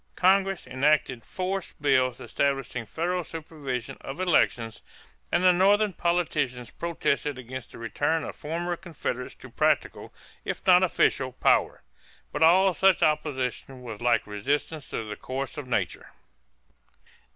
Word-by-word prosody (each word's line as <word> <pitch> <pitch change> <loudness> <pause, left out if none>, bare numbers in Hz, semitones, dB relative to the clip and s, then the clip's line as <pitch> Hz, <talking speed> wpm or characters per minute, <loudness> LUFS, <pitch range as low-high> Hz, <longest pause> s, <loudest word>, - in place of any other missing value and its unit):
Congress 195 0 +3
enacted 130 -2 +1
force 190 +1 -4
bills 130 -3 +2
establishing 135 -4 -2
federal 175 - -1
supervision 140 -6 -6
of 135 +5 -7
elections 120 -10 +1 0.5
and 175 - +2
the 185 - +7
Northern 200 +3 +4
politicians 150 -9 -1
protested 150 -4 -1
against 125 0 -8
the - - -11
return 145 +7 -1
of - - -6
former 170 +3 -3
Confederates 155 -8 -5
to - - -13
practical, - - 0 0.3
if - - -5
not 180 -1 +7
official, 135 -7 +2
power; - - +2 0.5
but 145 - -4
all 185 +4 +6
such 190 0 +4
opposition 135 -4 -1
was 115 -3 -7
like 120 -1 +2
resistance 140 +8 -2
to 110 - -4
the 105 - -5
course 135 +1 -5
of 145 -4 -6
nature. 125 - -2
145 Hz, 130 wpm, -27 LUFS, 125-175 Hz, 0.5 s, the